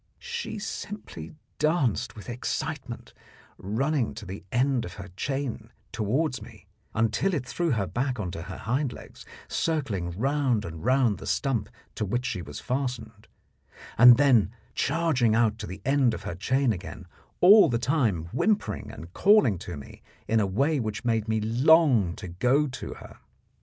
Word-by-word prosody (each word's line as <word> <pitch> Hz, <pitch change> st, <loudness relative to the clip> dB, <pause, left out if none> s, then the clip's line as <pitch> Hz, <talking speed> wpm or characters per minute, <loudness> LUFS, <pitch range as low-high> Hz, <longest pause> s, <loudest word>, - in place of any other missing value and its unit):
She 475 Hz, -, -5 dB
simply 200 Hz, -, -7 dB, 0.2 s
danced 155 Hz, -, +1 dB
with 105 Hz, -, -11 dB
excitement, 120 Hz, +1 st, -4 dB, 0.5 s
running 125 Hz, +6 st, -1 dB
to 110 Hz, -, -8 dB
the 95 Hz, +2 st, -8 dB
end 130 Hz, 0 st, +1 dB
of 90 Hz, -, -8 dB
her 100 Hz, -1 st, -9 dB
chain 135 Hz, -2 st, -3 dB, 0.2 s
toward 120 Hz, +5 st, -1 dB
me 105 Hz, -, -13 dB, 0.3 s
until 115 Hz, -, +1 dB
it 135 Hz, -4 st, -3 dB
threw 170 Hz, +7 st, -1 dB
her 110 Hz, -8 st, +1 dB
back 125 Hz, -, -2 dB
on 90 Hz, -4 st, -3 dB
to 85 Hz, -, -6 dB
her 90 Hz, +2 st, -7 dB
hind 125 Hz, +4 st, -1 dB
legs, -, -, -13 dB, 0.2 s
circling 135 Hz, -, -1 dB
round 130 Hz, -3 st, +1 dB
and 80 Hz, -4 st, -8 dB
round 125 Hz, -5 st, +2 dB
the -, -, -8 dB
stump 120 Hz, -7 st, 0 dB, 0.2 s
to -, -, -3 dB
which 120 Hz, +5 st, -1 dB
she 95 Hz, -, -2 dB
was 75 Hz, -3 st, -8 dB
fastened, 125 Hz, -5 st, -4 dB, 0.7 s
and 120 Hz, 0 st, +9 dB
then 130 Hz, -9 st, +4 dB, 0.2 s
charging 140 Hz, -7 st, +1 dB
out 115 Hz, -1 st, +2 dB
to -, -, -5 dB
the 95 Hz, -, -9 dB
end 135 Hz, -4 st, +3 dB
of -, -, -9 dB
her -, -, -4 dB
chain 130 Hz, +7 st, +1 dB
again, 90 Hz, -1 st, -8 dB, 0.3 s
all 200 Hz, -1 st, +8 dB
the 120 Hz, -, +1 dB
time 115 Hz, -, 0 dB
whimpering 210 Hz, -, 0 dB
and 85 Hz, +2 st, -10 dB
calling 195 Hz, -, +4 dB
to 90 Hz, -2 st, -7 dB
me 70 Hz, -, -12 dB, 0.3 s
in 115 Hz, -, +2 dB
a 100 Hz, -, +1 dB
way 140 Hz, +10 st, +1 dB
which 110 Hz, 0 st, -4 dB
made 115 Hz, -2 st, +1 dB
me 110 Hz, 0 st, +1 dB
long 120 Hz, -, +4 dB
to 100 Hz, -, -8 dB
go 125 Hz, -, +2 dB
to 135 Hz, -2 st, -6 dB
her. -, -, -13 dB
120 Hz, 165 wpm, -27 LUFS, 105-140 Hz, 0.7 s, and